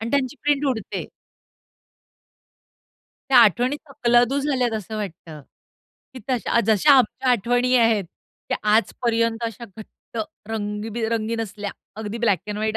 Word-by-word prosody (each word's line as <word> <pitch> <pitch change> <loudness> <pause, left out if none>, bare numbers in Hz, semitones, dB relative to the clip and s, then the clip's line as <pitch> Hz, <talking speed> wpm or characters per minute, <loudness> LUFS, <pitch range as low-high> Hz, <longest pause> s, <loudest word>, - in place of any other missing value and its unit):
आणि 225 +1 -4
त्यांची 280 0 0
प्रिंट 290 0 +1
उडते. 225 -6 -3 2.3
त्या 255 - +7
आठवणी 240 +5 +4
तकलादू 245 0 +2
झाल्यात 260 -4 0
असं 215 +2 -7
वाटतं, 170 -6 -7 0.7
की 255 - -7
तशा 235 -1 +1
जशा 225 +7 +5
आमच्या 255 +1 +2
आठवणी 245 +3 +2
आहेत, 225 -4 +3 0.4
त्या - - 0 0.2
आजपर्यंत 230 0 +1
अशा 230 +1 -5
घट्ट 220 +1 -11 0.3
रंगीबिरंगी 220 +1 -2
नसल्या 210 -2 -4 0.3
अगदी 220 +1 -5
ब्लॅक 210 -6 +2
एंड 210 0 -4
व्हाईट 220 +1 -1
230 Hz, 120 wpm, -23 LUFS, 215-250 Hz, 2.3 s, त्या